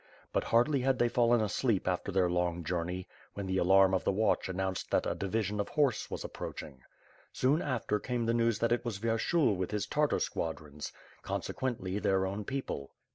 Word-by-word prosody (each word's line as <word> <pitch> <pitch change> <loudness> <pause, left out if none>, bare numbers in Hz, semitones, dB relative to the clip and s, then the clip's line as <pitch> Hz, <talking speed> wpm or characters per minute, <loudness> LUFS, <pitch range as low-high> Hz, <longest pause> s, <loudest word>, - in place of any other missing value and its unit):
But, - - +1
hardly 130 +5 +3
had 130 0 +2
they 120 -1 +3
fallen 120 -1 +3
asleep 105 0 0
after 90 +2 -1
their 95 -1 +3
long 85 -1 0
journey, 90 +2 -3 0.3
when 100 - -4
the 95 0 0
alarm 95 +1 +5
of 95 - +1
the - - +2
watch 105 -1 +1
announced 95 0 -2
that - - +2
a - - 0
divi 100 +3 -1
sion 105 +1 -3
of 100 - -1
horse 140 -6 +1
was - - -4
approaching. 65 -3 -7 0.5
Soon 140 +6 +2
after, 120 -8 -1
came 120 +1 -2
the 115 - +2
news 115 -1 +2
that 115 - 0
it 120 - +2
was 120 -5 -3
Vyershul 115 - +2
with 90 0 -2
his 105 -1 -1
Tartar 150 0 +1
squadrons, 75 -2 -4 0.3
consequently 105 -7 -3
their 95 -2 +2
own 100 +2 -3
people. 130 - -4
105 Hz, 190 wpm, -31 LUFS, 95-120 Hz, 0.5 s, alarm